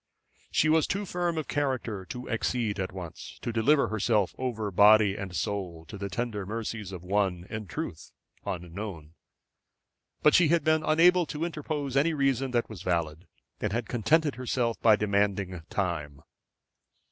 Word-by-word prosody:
She 155 Hz, -, +2 dB
was 160 Hz, -1 st, +4 dB
too 200 Hz, +1 st, -2 dB
firm 175 Hz, -2 st, -1 dB
of 155 Hz, -, -2 dB
character 130 Hz, -9 st, -2 dB
to 125 Hz, +7 st, -7 dB
accede 115 Hz, -2 st, -1 dB
at 95 Hz, -, -2 dB
once 90 Hz, -3 st, -8 dB
to 120 Hz, -, -2 dB
deliver 140 Hz, +6 st, +3 dB
herself 110 Hz, -2 st, +1 dB
over 110 Hz, -5 st, -2 dB
body 105 Hz, +1 st, +6 dB
and 95 Hz, -4 st, -6 dB
soul 85 Hz, 0 st, -3 dB
to 105 Hz, -, -9 dB
the 100 Hz, 0 st, -4 dB
tender 115 Hz, -1 st, -3 dB
mercies 110 Hz, -1 st, -4 dB
of 90 Hz, -2 st, -8 dB
one, 95 Hz, -2 st, 0 dB
in 110 Hz, -2 st, -5 dB
truth, 85 Hz, -, -6 dB, 0.3 s
unknown. 90 Hz, -3 st, -6 dB, 1.1 s
But 150 Hz, -, +6 dB
she 175 Hz, -3 st, +6 dB
had 170 Hz, +2 st, +3 dB
been 155 Hz, 0 st, +3 dB
unable 170 Hz, +2 st, +4 dB
to 155 Hz, +3 st, -3 dB
interpose 150 Hz, -4 st, -3 dB
any 155 Hz, +4 st, +3 dB
reason 135 Hz, -2 st, +1 dB
that 120 Hz, -2 st, 0 dB
was 105 Hz, -6 st, -9 dB
valid, 85 Hz, -1 st, -2 dB, 0.3 s
and 105 Hz, -, -1 dB
had 120 Hz, -1 st, -2 dB
contented 145 Hz, +6 st, +2 dB
herself 125 Hz, -2 st, -1 dB
by 110 Hz, -2 st, +6 dB
demanding 100 Hz, -3 st, 0 dB
time. 75 Hz, -7 st, -3 dB
110 Hz, 160 wpm, -28 LUFS, 95-140 Hz, 1.1 s, body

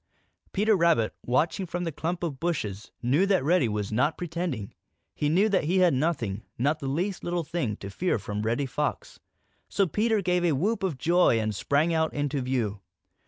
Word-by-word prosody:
Peter 210 Hz, +2 st, +3 dB
Rabbit, 165 Hz, -, +3 dB
watching 160 Hz, +9 st, +1 dB
from 175 Hz, +1 st, -3 dB
the 165 Hz, -, -2 dB
clump 170 Hz, +4 st, -3 dB
of 145 Hz, -6 st, -3 dB
bushes, 110 Hz, -, -3 dB
knew 130 Hz, +6 st, +2 dB
then 195 Hz, -1 st, +4 dB
that -, -, -4 dB
Reddy 150 Hz, -5 st, +3 dB
was 105 Hz, -1 st, -2 dB
not 125 Hz, +8 st, +1 dB
pretending. 170 Hz, -, -4 dB, 0.4 s
He 145 Hz, -, 0 dB
knew 190 Hz, +7 st, +4 dB
that 195 Hz, -6 st, +1 dB
he 180 Hz, +5 st, +1 dB
had 180 Hz, -4 st, +5 dB
nothing, 130 Hz, -, -1 dB, 0.2 s
not 145 Hz, +6 st, +1 dB
the 140 Hz, -, -4 dB
least 175 Hz, +8 st, -2 dB
little 175 Hz, -1 st, -1 dB
thing, 150 Hz, -9 st, -2 dB
to 100 Hz, -, -8 dB
fear 180 Hz, -, 0 dB
from 105 Hz, 0 st, -4 dB
Reddy 115 Hz, +6 st, 0 dB
Fox. 130 Hz, -, -3 dB, 0.5 s
So 195 Hz, -, +2 dB
Peter 215 Hz, +4 st, +1 dB
gave 180 Hz, 0 st, +1 dB
a 170 Hz, -3 st, +3 dB
whoop 205 Hz, +11 st, 0 dB
of 185 Hz, -8 st, -1 dB
joy 170 Hz, -4 st, +3 dB
and 110 Hz, -1 st, -1 dB
sprang 145 Hz, -, +1 dB
out 160 Hz, -1 st, 0 dB
into 145 Hz, -1 st, -1 dB
view. 120 Hz, -6 st, -1 dB
155 Hz, 195 wpm, -27 LUFS, 125-175 Hz, 0.5 s, had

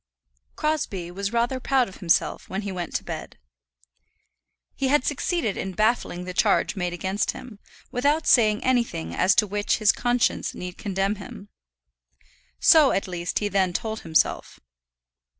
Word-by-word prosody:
Crosbie 210 Hz, -, -2 dB
was 200 Hz, +2 st, -3 dB
rather 235 Hz, +2 st, 0 dB
proud 260 Hz, -1 st, +2 dB
of 190 Hz, -, -12 dB
himself 170 Hz, -3 st, 0 dB
when 195 Hz, +3 st, -3 dB
he 200 Hz, -, -4 dB
went 175 Hz, -3 st, -5 dB
to -, -, -1 dB
bed. -, -, -7 dB, 1.4 s
He 270 Hz, -, -1 dB
had 275 Hz, -1 st, +2 dB
succeeded 290 Hz, -, -1 dB
in 190 Hz, -, -4 dB
baffling 215 Hz, -3 st, 0 dB
the 180 Hz, 0 st, -6 dB
charge 205 Hz, +3 st, +2 dB
made 180 Hz, -2 st, -2 dB
against 190 Hz, +3 st, -2 dB
him, 235 Hz, -5 st, -11 dB, 0.3 s
without 290 Hz, +5 st, +1 dB
saying 215 Hz, -4 st, +4 dB
anything 235 Hz, -, 0 dB
as 185 Hz, -, +3 dB
to -, -, +4 dB
which 205 Hz, +1 st, 0 dB
his 215 Hz, -2 st, +4 dB
conscience 245 Hz, 0 st, 0 dB
need 180 Hz, 0 st, -7 dB
condemn 195 Hz, 0 st, -2 dB
him. 200 Hz, +1 st, -10 dB, 1.1 s
So, 315 Hz, -4 st, +6 dB
at 195 Hz, -, -1 dB
least, 175 Hz, -1 st, -3 dB
he 210 Hz, -, 0 dB
then 190 Hz, -3 st, +1 dB
told 220 Hz, +3 st, -3 dB
himself. 160 Hz, -1 st, 0 dB
205 Hz, 150 wpm, -24 LUFS, 185-245 Hz, 1.4 s, So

